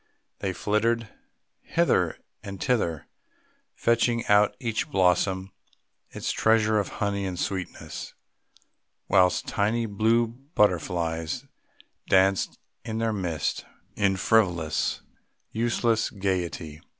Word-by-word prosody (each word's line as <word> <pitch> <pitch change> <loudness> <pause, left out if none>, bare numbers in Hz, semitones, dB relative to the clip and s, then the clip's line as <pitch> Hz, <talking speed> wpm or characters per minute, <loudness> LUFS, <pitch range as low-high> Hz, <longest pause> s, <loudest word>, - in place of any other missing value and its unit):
They 95 - -1
flitted 110 +4 0 0.5
hither - - +1 0.2
and 100 -2 -8
thither, 95 - 0 0.7
fetching 115 0 +1
out 105 0 +5
of - - -26
each 115 +2 -2
blossom 95 -2 +2 0.6
its - - -3
treasure 110 -1 +3
of 100 - -1 0.2
honey 100 -1 -1
and 90 -1 -4
sweetness, 95 0 -5 0.9
whilst 90 -2 +3
tiny 110 +3 0
blue 110 +3 +2 0.3
butterflies 85 -4 0 0.6
danced 95 0 +3 0.3
in 110 -1 -4
their 115 -1 0
midst 85 -7 -2 0.3
in 95 -1 +2
frivolous 85 -8 +1 0.5
useless 115 0 +1
gaiety. 90 -6 -3
100 Hz, 100 wpm, -26 LUFS, 90-110 Hz, 0.9 s, out